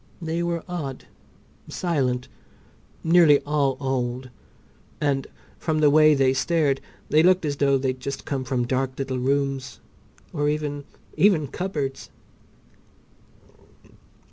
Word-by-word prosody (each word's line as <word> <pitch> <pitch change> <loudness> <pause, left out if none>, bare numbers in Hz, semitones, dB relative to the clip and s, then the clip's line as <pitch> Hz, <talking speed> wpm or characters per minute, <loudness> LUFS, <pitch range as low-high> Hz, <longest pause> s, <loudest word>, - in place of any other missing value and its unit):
They 165 -1 -2
were 170 -1 -2
odd, 150 -8 -5 0.6
silent, 130 -8 -1 0.8
nearly 165 -3 +6
all 145 -3 0
old, 130 -1 -2 0.7
and 140 -2 0 0.3
from 160 -2 -1
the 150 -2 +4
way 155 0 +6
they 135 -1 +3
stared 145 -1 +1 0.3
they 155 - +5
looked 185 0 +4
as 145 -1 -2
though 140 -1 +3
they'd 130 -1 -2
just 140 +2 -5
come 135 -2 -2
from 125 -1 -1
dark 130 +1 -1
little 130 -2 -3
rooms 135 0 -1 0.5
or 145 0 0
even—even 150 +3 -1
cupboards! 145 -6 -4
140 Hz, 115 wpm, -24 LUFS, 130-155 Hz, 0.8 s, nearly